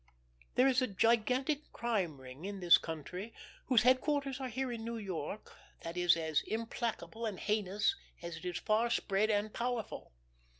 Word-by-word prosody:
There 255 Hz, +2 st, +5 dB
is 260 Hz, -1 st, +3 dB
a 255 Hz, -, +2 dB
gigantic 250 Hz, +8 st, +1 dB
Crime 195 Hz, -, -1 dB
Ring 130 Hz, +4 st, -11 dB
in 200 Hz, 0 st, -4 dB
this 175 Hz, -2 st, +7 dB
country, 180 Hz, +7 st, -6 dB, 0.3 s
whose 245 Hz, -4 st, +5 dB
headquarters 275 Hz, +1 st, +2 dB
are 265 Hz, -, -3 dB
here 260 Hz, +2 st, -2 dB
in 230 Hz, -2 st, -5 dB
New 230 Hz, 0 st, -3 dB
York, 195 Hz, -1 st, -5 dB, 0.3 s
that 165 Hz, +1 st, -5 dB
is 175 Hz, -1 st, +4 dB
as 160 Hz, -2 st, +1 dB
implacable 230 Hz, 0 st, -3 dB
and 205 Hz, -4 st, -4 dB
heinous 210 Hz, -, +1 dB, 0.2 s
as 170 Hz, -1 st, -6 dB
it 165 Hz, -, -10 dB
is 180 Hz, -1 st, -2 dB
far 220 Hz, +2 st, +2 dB
spread 210 Hz, -1 st, +1 dB
and 210 Hz, 0 st, +1 dB
powerful. 240 Hz, -2 st, -3 dB
215 Hz, 165 wpm, -34 LUFS, 180-245 Hz, 0.3 s, this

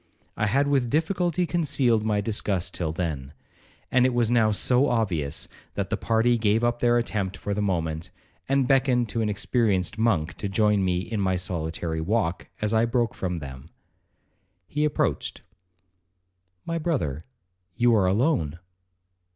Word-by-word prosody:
I 110 Hz, -, 0 dB
had 140 Hz, +7 st, +2 dB
with 135 Hz, -4 st, +1 dB
difficulty 175 Hz, +3 st, +1 dB
concealed 140 Hz, -9 st, +1 dB
my 105 Hz, -1 st, +1 dB
disgust 100 Hz, -4 st, -1 dB
till 80 Hz, -3 st, -2 dB
then, 75 Hz, -5 st, -4 dB, 0.6 s
and 125 Hz, 0 st, +4 dB
it 130 Hz, -1 st, +2 dB
was 120 Hz, -1 st, +2 dB
now 115 Hz, -3 st, +4 dB
so 125 Hz, +6 st, +3 dB
obvious, 85 Hz, -11 st, -1 dB, 0.3 s
that -, -, -3 dB
the -, -, +2 dB
party 115 Hz, +1 st, +2 dB
gave 110 Hz, +1 st, +2 dB
up 120 Hz, 0 st, +1 dB
their 120 Hz, 0 st, +3 dB
attempt 100 Hz, -5 st, -2 dB
for 100 Hz, -, -3 dB
the 105 Hz, -, -1 dB
moment, 80 Hz, -5 st, -2 dB, 0.4 s
and 135 Hz, -2 st, +2 dB
beckoned 125 Hz, -3 st, +2 dB
to 115 Hz, -, -1 dB
an 110 Hz, -, 0 dB
experienced 105 Hz, -2 st, 0 dB
monk 90 Hz, -8 st, +1 dB
to 100 Hz, -, -3 dB
join 105 Hz, 0 st, +2 dB
me 90 Hz, -1 st, +1 dB
in 110 Hz, +1 st, -3 dB
my 95 Hz, -1 st, +1 dB
solitary 80 Hz, -2 st, -3 dB
walk, 95 Hz, -1 st, -1 dB, 0.2 s
as 105 Hz, +1 st, +1 dB
I 110 Hz, +1 st, +4 dB
broke 120 Hz, -1 st, 0 dB
from 90 Hz, -2 st, -3 dB
them. 70 Hz, -1 st, -9 dB, 1.0 s
He 150 Hz, +8 st, -1 dB
approached, 150 Hz, -, -1 dB, 1.2 s
'My 165 Hz, 0 st, -2 dB
brother, 105 Hz, -, -1 dB, 0.5 s
you 120 Hz, 0 st, +3 dB
are 100 Hz, -4 st, +3 dB
alone.' 95 Hz, -, +1 dB
110 Hz, 155 wpm, -25 LUFS, 90-120 Hz, 1.2 s, and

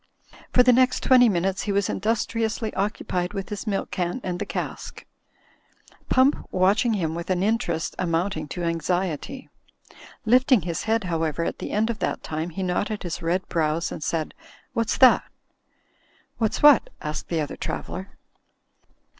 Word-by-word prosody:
For 250 Hz, -, +6 dB
the 250 Hz, 0 st, +6 dB
next 255 Hz, +1 st, +3 dB
twenty 250 Hz, -2 st, +6 dB
minutes 190 Hz, 0 st, 0 dB
he 205 Hz, -, -2 dB
was 200 Hz, -1 st, +1 dB
industriously 225 Hz, +1 st, -1 dB
occupied 185 Hz, -3 st, -2 dB
with 195 Hz, -1 st, -5 dB
his 210 Hz, +2 st, -6 dB
milk 200 Hz, -2 st, -2 dB
can 180 Hz, +5 st, -2 dB
and 180 Hz, -1 st, -3 dB
the -, -, -3 dB
cask; -, -, -5 dB, 1.0 s
Pump 260 Hz, +3 st, +4 dB
watch 190 Hz, +3 st, +3 dB
ing 235 Hz, -2 st, +1 dB
him 165 Hz, -6 st, -1 dB
with 170 Hz, +2 st, -6 dB
an 185 Hz, 0 st, +1 dB
interest 200 Hz, -7 st, 0 dB
amounting 165 Hz, -2 st, -1 dB
to 175 Hz, +4 st, -5 dB
anxiety. 175 Hz, -, -2 dB, 0.8 s
Lift 250 Hz, +5 st, +4 dB
ing 245 Hz, -6 st, +6 dB
his 170 Hz, -2 st, -4 dB
head, 225 Hz, 0 st, +1 dB
however, 165 Hz, -2 st, -1 dB
at -, -, -4 dB
the -, -, -5 dB
end 220 Hz, +3 st, +1 dB
of 225 Hz, -, -7 dB
that -, -, -2 dB
time, 155 Hz, +2 st, -3 dB
he 190 Hz, +3 st, -4 dB
knotted 200 Hz, +4 st, -1 dB
his 175 Hz, -2 st, -4 dB
red 175 Hz, +3 st, -1 dB
brows 160 Hz, 0 st, 0 dB
and -, -, -6 dB
said, 160 Hz, -2 st, -2 dB, 0.4 s
'What's 230 Hz, -2 st, 0 dB
that?" 260 Hz, -2 st, +7 dB, 1.2 s
'What's 220 Hz, +3 st, -1 dB
what?" 295 Hz, -5 st, +7 dB
asked 150 Hz, -1 st, -4 dB
the 165 Hz, -, -1 dB
other 150 Hz, -2 st, -3 dB
traveller. 190 Hz, +1 st, -6 dB
190 Hz, 165 wpm, -24 LUFS, 170-225 Hz, 1.2 s, that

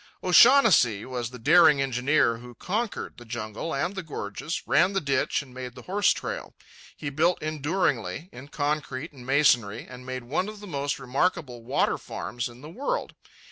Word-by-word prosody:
O'Shaughnessy 180 Hz, -, +6 dB
was 125 Hz, -3 st, -4 dB
the 125 Hz, -, -10 dB
daring 150 Hz, +4 st, +6 dB
engineer 125 Hz, -2 st, +2 dB
who 120 Hz, +1 st, -12 dB
conquered 215 Hz, -, -3 dB
the 120 Hz, -, -11 dB
jungle 115 Hz, +5 st, -5 dB
and 140 Hz, +7 st, -1 dB
the 190 Hz, -, -4 dB
gorges, 150 Hz, -, -5 dB
ran 185 Hz, +4 st, +3 dB
the 195 Hz, -, +1 dB
ditch 140 Hz, -3 st, 0 dB
and 130 Hz, -2 st, -16 dB
made 125 Hz, -1 st, -7 dB
the -, -, -11 dB
horse 200 Hz, +2 st, +2 dB
trail. -, -, -5 dB, 0.4 s
He 145 Hz, -2 st, -4 dB
built 165 Hz, +5 st, +2 dB
enduringly, 155 Hz, +3 st, -1 dB
in 130 Hz, +3 st, -11 dB
concrete 145 Hz, 0 st, -3 dB
and 130 Hz, -4 st, -13 dB
masonry, 125 Hz, -6 st, +3 dB
and 125 Hz, 0 st, -11 dB
made 130 Hz, -1 st, -5 dB
one 165 Hz, +11 st, -1 dB
of 215 Hz, -1 st, -10 dB
the 205 Hz, -, -10 dB
most 140 Hz, -6 st, -2 dB
remarkable 130 Hz, -2 st, -1 dB
water 130 Hz, +5 st, 0 dB
farms 120 Hz, +1 st, -5 dB
in 120 Hz, +1 st, -14 dB
the 150 Hz, -, -10 dB
world. 285 Hz, -, -3 dB
140 Hz, 175 wpm, -26 LUFS, 125-170 Hz, 0.4 s, O'Shaughnessy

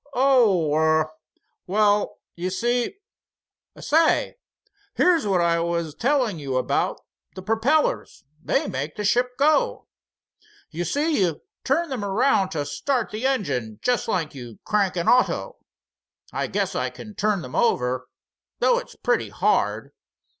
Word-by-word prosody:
"Oh, 230 Hz, -, +3 dB
er—well—you 160 Hz, +5 st, -1 dB
see—say, 290 Hz, -, -2 dB, 0.6 s
here's 340 Hz, -9 st, +3 dB
what 185 Hz, -3 st, +2 dB
I 170 Hz, 0 st, +2 dB
was 170 Hz, -2 st, -2 dB
telling 245 Hz, -, 0 dB
you 135 Hz, -3 st, -2 dB
about, 130 Hz, -, 0 dB, 0.4 s
the 185 Hz, -, -8 dB
perpellers, 225 Hz, +9 st, 0 dB, 0.2 s
they -, -, 0 dB
make 145 Hz, +4 st, -4 dB
the 210 Hz, -, -4 dB
ship 250 Hz, +4 st, +1 dB
go. 290 Hz, +2 st, +2 dB, 0.9 s
You 170 Hz, +2 st, -3 dB
see 290 Hz, -, 0 dB
you 170 Hz, -5 st, 0 dB, 0.2 s
turn 320 Hz, +5 st, +1 dB
them 255 Hz, -6 st, -3 dB
around 200 Hz, -1 st, +2 dB
to 145 Hz, -2 st, -2 dB
start 250 Hz, -, -2 dB
the 220 Hz, +5 st, -1 dB
engine, 135 Hz, -, -2 dB
jest 250 Hz, -1 st, +1 dB
like 175 Hz, -8 st, -1 dB
you 120 Hz, -5 st, -10 dB
crank 200 Hz, -3 st, +1 dB
an 170 Hz, -1 st, -2 dB
auto. 250 Hz, +1 st, +2 dB, 0.8 s
I -, -, -1 dB
guess -, -, -1 dB
I -, -, -1 dB
can 215 Hz, -, -11 dB
turn 205 Hz, -2 st, 0 dB
them 125 Hz, -, -9 dB
over, 125 Hz, -, +1 dB, 0.5 s
though 485 Hz, -1 st, +3 dB
it's -, -, -12 dB
pretty -, -, 0 dB
hard. -, -, 0 dB
205 Hz, 130 wpm, -23 LUFS, 160-255 Hz, 0.9 s, Oh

